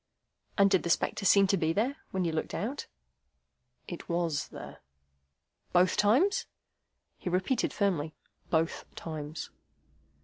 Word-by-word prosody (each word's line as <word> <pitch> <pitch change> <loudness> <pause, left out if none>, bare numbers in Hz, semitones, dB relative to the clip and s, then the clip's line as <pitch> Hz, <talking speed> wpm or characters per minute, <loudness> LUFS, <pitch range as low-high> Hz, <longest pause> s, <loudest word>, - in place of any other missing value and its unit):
"And 200 -1 +7
did 190 - +4
the 170 - -3
spectre 195 - +1
seem 200 0 +7
to 195 0 +2
be 160 -1 +1
there, 245 - 0
when 190 -1 -1
you 165 - +1
looked 160 0 -2
out?" 255 +8 -3 1.0
"It 175 - -7
WAS 170 -3 0
there." - - -10 0.9
"Both 180 +1 +4
times?" 270 - +3 0.7
He - - -3
repeated 185 +8 +1
firmly: 170 -7 0 0.3
"Both 160 0 +1
times." 155 -1 -6
180 Hz, 130 wpm, -30 LUFS, 165-205 Hz, 1.0 s, And